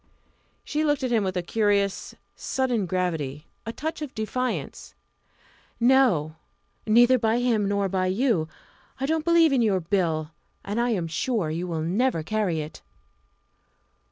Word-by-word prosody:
She 305 +1 -1
looked 290 -2 +1
at 255 - -1
him 225 -3 +2
with 185 -1 -2
a 180 - -1
curious, 200 0 0 0.2
sudden 245 -7 -1
gravity 160 -5 -2 0.2
a - - -2
touch 315 +6 -5
of 295 -3 -6
defiance. 250 +3 -3 0.8
"No! 235 - +3 0.5
neither 240 +3 +5
by 225 0 +2
him, 235 -4 +1
nor 200 0 0
by 185 -1 0
you. 190 -4 +1 0.5
I 270 - -1
don't 320 +2 0
believe 335 -2 +4
in 260 - +3
your 205 -5 +2
Bill 165 -3 -1 0.3
and 210 +4 -1
I 240 - +1
am 190 -8 0
sure 165 +1 -1
you 170 +3 -3
will 160 -2 -2
never 190 +1 0
carry 195 -4 -1
it!" 150 +1 -9
210 Hz, 150 wpm, -25 LUFS, 175-250 Hz, 0.8 s, neither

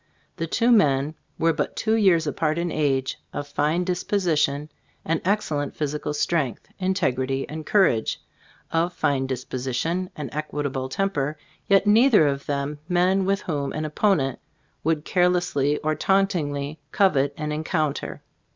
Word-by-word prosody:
The 165 - -2
two 230 +8 +2
men 145 - +3 0.2
were 165 0 +2
but - - -2
two 220 - 0
years 190 -7 +4
apart 155 +1 0
in 170 0 -1
age, 135 -3 0
of 145 - -4
fine 150 +5 0
disposition 170 -5 0 0.3
and 165 0 0
excellent 160 -8 -1
physical 150 0 -2
strength, 150 -5 -1
integrity 135 -9 0
and 155 0 -7
cour 200 -2 +5
age; 110 -8 0 0.5
of 170 +2 +1
fine 135 -2 0
disposition 130 +7 -2
and 145 -5 -6
equable 145 -3 -3
temper; 150 -4 -1 0.3
yet 195 0 +4
neither 220 - +6
of 140 -1 -1
them 145 +1 -2
men 185 +2 +3
with 195 +1 +1
whom 145 -5 -2
an 155 0 -3
opponent 150 - +1 0.4
would 160 0 0
carelessly 175 -6 +2
or 155 0 +1
tauntingly 155 -6 0
covet 145 -8 +3
an 150 0 -3
encounter. 155 -1 -2
155 Hz, 140 wpm, -24 LUFS, 140-180 Hz, 0.5 s, neither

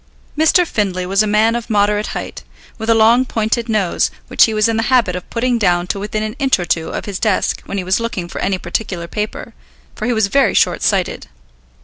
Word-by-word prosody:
Mr. 320 +3 +4
Findlay 190 - -2
was 195 +3 +2
a 215 - +1
man 215 +2 +2
of 235 -1 -5
moderate 210 0 +1
height, - - -7 0.4
with 220 +1 -4
a 230 - +5
long 225 +3 +5
pointed 230 -1 -2
nose 210 -5 +1 0.2
which - - +5
he 225 - -2
was 215 0 +3
in 225 - 0
the - - +1
habit 240 -9 +3
of 180 - -7
putting 240 0 0
down 175 -4 +2
to 195 - -3
within 215 +1 -3
an 215 +1 -4
inch 270 -1 +3
or 175 - -4
two 165 -1 -1
of - - -5
his 200 -2 -5
desk 215 -4 0
when 200 - -4
he 190 - -2
was 185 +3 +1
looking 230 -6 -4
for - - -6
any 190 0 0
particular 175 -1 -4
paper, 210 +4 -5 0.4
for 215 - -4
he 245 - +1
was 220 -2 +2
very 270 +7 +2
short - - +2
sighted. - - 0
215 Hz, 230 wpm, -17 LUFS, 190-230 Hz, 0.4 s, a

